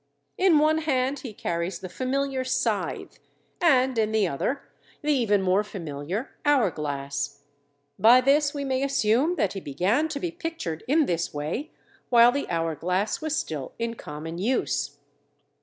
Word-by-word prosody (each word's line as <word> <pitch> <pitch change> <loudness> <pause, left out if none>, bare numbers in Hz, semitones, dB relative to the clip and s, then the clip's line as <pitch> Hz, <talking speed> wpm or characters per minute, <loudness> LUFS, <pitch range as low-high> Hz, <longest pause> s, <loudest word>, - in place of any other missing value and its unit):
In 365 -4 +4
one 310 +1 +3
hand 275 -3 0
he 250 - -7
carries 170 -2 -3
the 185 - -7
familiar 265 +5 -1
scythe, 255 0 -2 0.4
and, 265 -6 +4
in 215 -1 +1
the 215 -3 +2
other, 245 - -2 0.4
the 300 0 +2
even 210 -7 +2
more 190 +2 +3
familiar 175 - -5
hour 275 - +3
glass. 140 -1 -4 0.6
By 235 +3 +8
this 285 +3 +3
we 285 -1 -4
may 260 -1 0
assume 275 +3 +2
that 200 - 0
he 195 - -4
began 185 - +1
to 290 -2 -3
be 350 +1 -3
pictured 330 - -5
in 300 +3 +4
this 170 - -2
way 155 - -3 0.4
while 240 0 +7
the 285 +2 -3
hour 165 -1 0
glass 180 - -1
was 315 -1 -1
still 150 -4 -4
in 230 0 -2
common 160 -3 -7
use. 245 +7 -1
230 Hz, 155 wpm, -26 LUFS, 170-280 Hz, 0.6 s, By